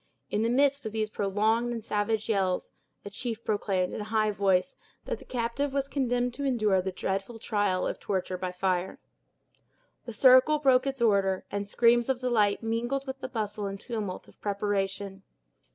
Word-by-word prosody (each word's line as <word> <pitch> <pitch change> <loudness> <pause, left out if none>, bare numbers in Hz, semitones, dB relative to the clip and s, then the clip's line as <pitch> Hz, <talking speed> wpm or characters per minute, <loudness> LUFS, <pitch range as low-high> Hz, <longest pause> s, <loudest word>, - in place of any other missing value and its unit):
In 210 - +1
the 230 - +1
midst 280 +3 +3
of 215 - -7
these 215 -1 -1
prolonged 215 +4 +1
and 230 -2 -5
savage 210 +1 0
yells, 195 -4 0 0.3
a 205 - -7
chief 230 +1 -5
proclaimed, 195 -3 0
in - - -4
a - - -5
high 215 -1 +1
voice, 195 +3 +1 0.3
that - - -3
the - - -14
captive 250 +3 -2
was 275 -1 0
condemned 245 -3 0
to 280 - -5
endure 215 -8 +2
the 190 +1 -3
dreadful 195 +5 -3
trial 205 -4 0
of - - -3
torture 190 -2 -2
by 185 -1 -3
fire. 180 0 -1 1.1
The 235 - -6
circle 260 +6 +6
broke 265 -2 +3
its 270 -3 -1
order, 195 -4 +2
and 200 0 -3
screams 235 +2 +4
of 265 - +2
delight 225 -5 +2
mingled 240 +5 -1
with 265 0 -6
the 260 - -4
bustle 210 -4 -3
and 195 0 -5
tumult 215 -6 -5
of - - -21
preparation. 200 -1 -2
215 Hz, 180 wpm, -28 LUFS, 200-245 Hz, 1.1 s, circle